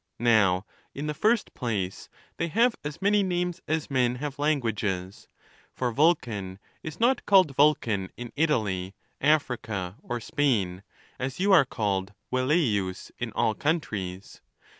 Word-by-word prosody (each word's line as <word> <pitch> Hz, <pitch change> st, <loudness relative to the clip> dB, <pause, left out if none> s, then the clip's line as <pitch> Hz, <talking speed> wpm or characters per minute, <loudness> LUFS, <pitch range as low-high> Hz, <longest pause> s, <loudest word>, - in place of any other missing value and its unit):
Now, 105 Hz, -5 st, +3 dB, 0.3 s
in 145 Hz, -, -4 dB
the 150 Hz, -, -2 dB
first 220 Hz, +7 st, +1 dB
place, 100 Hz, -7 st, -3 dB, 0.3 s
they 170 Hz, -, -1 dB
have 230 Hz, +8 st, +3 dB
as 150 Hz, +5 st, -6 dB
many 205 Hz, +1 st, +4 dB
names 180 Hz, -1 st, -1 dB
as 155 Hz, -2 st, -1 dB
men 125 Hz, -2 st, +2 dB
have 140 Hz, +2 st, -5 dB
languages; 110 Hz, -10 st, -1 dB, 0.5 s
for 125 Hz, -2 st, -1 dB
Vulcan 115 Hz, -, +1 dB, 0.2 s
is 160 Hz, +1 st, -7 dB
not 245 Hz, +2 st, +3 dB
called 185 Hz, -9 st, +5 dB
Vulcan 115 Hz, -10 st, +2 dB
in 120 Hz, -1 st, -7 dB
Italy, 105 Hz, -, 0 dB, 0.3 s
Africa, 115 Hz, -10 st, 0 dB
or 120 Hz, -, -4 dB
Spain, 110 Hz, -9 st, 0 dB, 0.4 s
as 130 Hz, +3 st, -4 dB
you 200 Hz, +2 st, +2 dB
are 165 Hz, -7 st, +7 dB
called 100 Hz, -5 st, -2 dB, 0.2 s
Velle 130 Hz, +1 st, +1 dB, 0.2 s
ius 95 Hz, -2 st, -3 dB
in 120 Hz, -2 st, -3 dB
all 110 Hz, -, +1 dB
countries. 105 Hz, -, -3 dB
125 Hz, 140 wpm, -27 LUFS, 100-155 Hz, 0.5 s, are